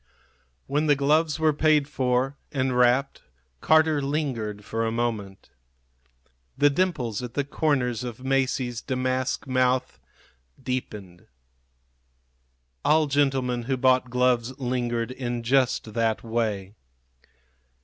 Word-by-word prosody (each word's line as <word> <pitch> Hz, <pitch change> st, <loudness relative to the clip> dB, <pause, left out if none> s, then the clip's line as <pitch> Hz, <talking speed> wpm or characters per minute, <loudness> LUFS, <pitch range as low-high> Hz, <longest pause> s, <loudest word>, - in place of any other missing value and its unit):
When 150 Hz, +3 st, 0 dB
the 145 Hz, -, +5 dB
gloves 150 Hz, +3 st, +2 dB
were 155 Hz, -1 st, +3 dB
paid 150 Hz, -1 st, +3 dB
for 130 Hz, -1 st, 0 dB, 0.2 s
and 130 Hz, -2 st, -1 dB
wrapped 125 Hz, +2 st, +2 dB, 0.4 s
Carter 155 Hz, -, +3 dB
lingered 125 Hz, -8 st, -3 dB
for 115 Hz, 0 st, -2 dB
a 115 Hz, -, 0 dB
moment. 110 Hz, -5 st, -3 dB, 1.1 s
The 145 Hz, +1 st, +4 dB
dimples 135 Hz, -, -1 dB
at 125 Hz, -1 st, -7 dB
the 145 Hz, -, +1 dB
corners 130 Hz, -5 st, 0 dB
of 120 Hz, -3 st, -6 dB
Masie's 130 Hz, -3 st, 0 dB
damask 130 Hz, 0 st, -2 dB
mouth 130 Hz, -1 st, 0 dB, 0.6 s
deepened. 105 Hz, -8 st, -6 dB, 1.6 s
All 155 Hz, 0 st, +4 dB
gentlemen 135 Hz, -4 st, 0 dB
who 135 Hz, +1 st, -1 dB
bought 130 Hz, 0 st, +3 dB
gloves 125 Hz, 0 st, +1 dB
lingered 120 Hz, -2 st, -2 dB
in 120 Hz, -2 st, -4 dB
just 125 Hz, -3 st, +1 dB
that 115 Hz, -2 st, 0 dB
way. 110 Hz, -4 st, -2 dB
130 Hz, 110 wpm, -25 LUFS, 120-140 Hz, 1.6 s, the